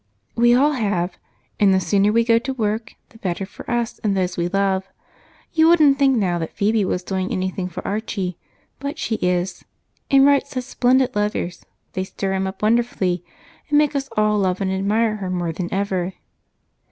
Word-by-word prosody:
"We 240 Hz, +1 st, +5 dB
all 285 Hz, +4 st, +4 dB
have 200 Hz, -9 st, -1 dB, 0.4 s
and 200 Hz, -2 st, +5 dB
the 190 Hz, -, +4 dB
sooner 195 Hz, +3 st, +2 dB
we 230 Hz, +1 st, +3 dB
go 230 Hz, 0 st, +4 dB
to 265 Hz, +3 st, -4 dB
work 220 Hz, -1 st, -2 dB
the 225 Hz, -, -18 dB
better 190 Hz, 0 st, -2 dB
for 190 Hz, -, -11 dB
us 240 Hz, -1 st, -1 dB
and 200 Hz, -2 st, +1 dB
those 180 Hz, -1 st, 0 dB
we 170 Hz, 0 st, 0 dB
love. 195 Hz, 0 st, 0 dB, 0.6 s
You 320 Hz, 0 st, +5 dB
wouldn't 305 Hz, -5 st, +5 dB
think 270 Hz, -2 st, +4 dB
now 180 Hz, -5 st, +1 dB
that 165 Hz, -, -5 dB
Phebe 215 Hz, +1 st, +1 dB
was 180 Hz, 0 st, -2 dB
doing 190 Hz, 0 st, -2 dB
anything 185 Hz, 0 st, -2 dB
for 175 Hz, -, -7 dB
Archie, 195 Hz, -3 st, -3 dB, 0.4 s
but 280 Hz, +3 st, -4 dB
she 225 Hz, -7 st, -2 dB
is, 180 Hz, 0 st, -1 dB, 0.5 s
and 275 Hz, 0 st, +6 dB
writes 280 Hz, -1 st, +3 dB
such 255 Hz, -2 st, -3 dB
splendid 255 Hz, 0 st, +2 dB
letters, 205 Hz, -4 st, -2 dB, 0.3 s
they 185 Hz, -, -1 dB
stir 190 Hz, 0 st, -3 dB
him 190 Hz, 0 st, 0 dB
up 190 Hz, +2 st, -7 dB
wonderfully 210 Hz, -6 st, +1 dB, 0.5 s
and 295 Hz, -, +3 dB
make 295 Hz, -1 st, +3 dB
us 275 Hz, -1 st, -2 dB
all 215 Hz, 0 st, +3 dB
love 185 Hz, -2 st, 0 dB
and 190 Hz, -2 st, -1 dB
admire 215 Hz, +3 st, +1 dB
her 190 Hz, -3 st, -4 dB
more 175 Hz, -2 st, -1 dB
than 175 Hz, +2 st, -5 dB
ever." 190 Hz, -2 st, -1 dB
205 Hz, 190 wpm, -21 LUFS, 185-240 Hz, 0.6 s, and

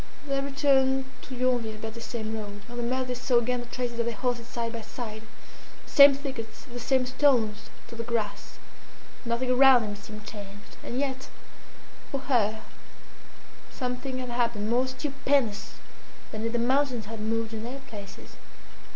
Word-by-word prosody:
They 275 Hz, -1 st, +1 dB
returned 270 Hz, -1 st, +3 dB, 0.2 s
to 260 Hz, -, -5 dB
Yonville 245 Hz, -3 st, +1 dB
by 220 Hz, +1 st, -5 dB
the 230 Hz, +1 st, -9 dB
same 225 Hz, -2 st, -4 dB
road. 205 Hz, -1 st, -6 dB
On 240 Hz, 0 st, -8 dB
the -, -, -1 dB
mud 255 Hz, +2 st, 0 dB
they 250 Hz, -, -1 dB
saw 250 Hz, 0 st, +2 dB
again 245 Hz, +1 st, +1 dB
the 240 Hz, -, -7 dB
traces 240 Hz, -1 st, -3 dB
of 235 Hz, -, +1 dB
their 235 Hz, -, -1 dB
horses 240 Hz, 0 st, -1 dB
side 235 Hz, -1 st, -3 dB
by 230 Hz, -, -4 dB
side, 220 Hz, -1 st, -6 dB, 0.6 s
the -, -, -14 dB
same 280 Hz, -1 st, +9 dB
thickets, 265 Hz, -5 st, -6 dB
the 245 Hz, -3 st, -7 dB
same 260 Hz, +1 st, +2 dB
stones 250 Hz, -5 st, +2 dB, 0.2 s
to -, -, -11 dB
the 230 Hz, 0 st, -4 dB
grass; 220 Hz, -4 st, -3 dB, 0.7 s
nothing 240 Hz, +2 st, 0 dB
around 255 Hz, -1 st, +7 dB
them 205 Hz, -1 st, -3 dB
seemed 210 Hz, +1 st, -10 dB
changed; 205 Hz, -1 st, -9 dB
and 245 Hz, -, -3 dB
yet 265 Hz, -2 st, -2 dB, 0.8 s
for 275 Hz, -, -3 dB
her 220 Hz, -5 st, +1 dB, 1.1 s
something 255 Hz, 0 st, -3 dB
had 255 Hz, -1 st, -4 dB
happened 235 Hz, -3 st, 0 dB
more 250 Hz, +2 st, +3 dB
stupendous 265 Hz, -3 st, 0 dB, 0.6 s
than 220 Hz, +1 st, -2 dB
if -, -, -2 dB
the 240 Hz, -, 0 dB
mountains 250 Hz, -1 st, +2 dB
had 225 Hz, +1 st, -7 dB
moved 225 Hz, +1 st, -1 dB
in 220 Hz, 0 st, -4 dB
their 260 Hz, +4 st, -6 dB
places. 205 Hz, -7 st, -10 dB
240 Hz, 170 wpm, -28 LUFS, 220-260 Hz, 1.1 s, same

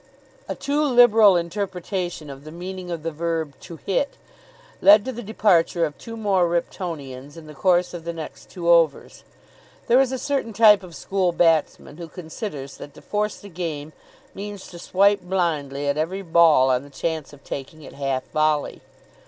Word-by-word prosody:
A -, -, -2 dB
too 280 Hz, +2 st, 0 dB
liberal 240 Hz, -7 st, +6 dB
interpretation 175 Hz, -3 st, -4 dB
of 135 Hz, 0 st, -11 dB
the 155 Hz, -, -10 dB
meaning 180 Hz, +2 st, -7 dB
of 170 Hz, -3 st, -5 dB
the 165 Hz, -, -2 dB
verb 160 Hz, -2 st, -2 dB
"to 170 Hz, -, -10 dB
hit" 200 Hz, -, -2 dB, 0.6 s
led 205 Hz, +1 st, +7 dB
to 260 Hz, -, -2 dB
the 240 Hz, -1 st, -7 dB
departure 190 Hz, -6 st, +2 dB
of 150 Hz, -2 st, -6 dB
two 230 Hz, 0 st, -8 dB
more 195 Hz, -5 st, +2 dB
Riptonians 150 Hz, -5 st, -4 dB
in 165 Hz, -, -11 dB
the 155 Hz, -, -11 dB
course 180 Hz, +3 st, +2 dB
of 170 Hz, -2 st, -7 dB
the 170 Hz, -, -3 dB
next 165 Hz, -2 st, -9 dB
two 175 Hz, -3 st, -6 dB
overs. 165 Hz, -4 st, +2 dB, 0.6 s
There 250 Hz, +3 st, +5 dB
is 265 Hz, -1 st, +1 dB
a 260 Hz, -, -2 dB
certain 270 Hz, -4 st, -2 dB
type 210 Hz, -1 st, +6 dB
of 180 Hz, -3 st, -12 dB
school 190 Hz, 0 st, 0 dB
batsman 165 Hz, -3 st, +1 dB
who 170 Hz, -1 st, -7 dB
considers 160 Hz, -4 st, -7 dB
that 145 Hz, -, -11 dB
to -, -, -13 dB
force 210 Hz, 0 st, -2 dB
the 205 Hz, -, -12 dB
game 160 Hz, -4 st, -5 dB, 0.4 s
means 205 Hz, 0 st, -7 dB
to 175 Hz, -, -11 dB
swipe 200 Hz, +3 st, +3 dB
blindly 155 Hz, -7 st, -1 dB
at 140 Hz, +1 st, 0 dB
every 185 Hz, +5 st, -2 dB
ball 165 Hz, -6 st, +5 dB
on 125 Hz, 0 st, +1 dB
the 145 Hz, -, -13 dB
chance 160 Hz, +1 st, -4 dB
of 145 Hz, -1 st, -16 dB
taking 145 Hz, +3 st, -7 dB
it -, -, -11 dB
half 135 Hz, -2 st, -2 dB
volley. 155 Hz, -1 st, 0 dB
170 Hz, 180 wpm, -23 LUFS, 155-200 Hz, 0.6 s, led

